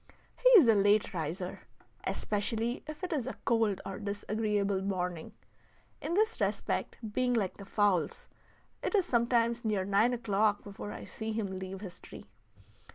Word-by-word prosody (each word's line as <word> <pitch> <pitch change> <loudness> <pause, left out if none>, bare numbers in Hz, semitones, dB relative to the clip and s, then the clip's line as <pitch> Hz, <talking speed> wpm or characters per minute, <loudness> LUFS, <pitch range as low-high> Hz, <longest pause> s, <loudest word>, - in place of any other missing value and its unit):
He - - +4
is 285 - +5
a 225 - +7
late 205 +1 +3
riser, 175 +2 -4 0.5
especially 225 +3 -1
if 305 +3 -8
it 365 -1 -2
is 275 -7 -1
a - - -5
cold 225 -4 +2
or 195 0 -5
disagreeable 205 -1 -1
morning, 180 -1 -3 0.7
in 340 - -2
this 435 +3 +1
respect - - -1 0.2
being 250 +1 +2
like 200 -5 0
the 200 - -9
fowls; 195 -5 +1 0.5
it - - -1
is 385 -4 +3
sometimes 235 -3 +2
near 210 -4 0
nine 205 +5 +3
o'clock 210 -3 +1
before 205 0 -7
I - - -7
see 220 0 -5
him 220 -1 -1
leave 190 0 -6
his 180 -4 -8
tree. - - -11
210 Hz, 160 wpm, -31 LUFS, 195-235 Hz, 0.7 s, a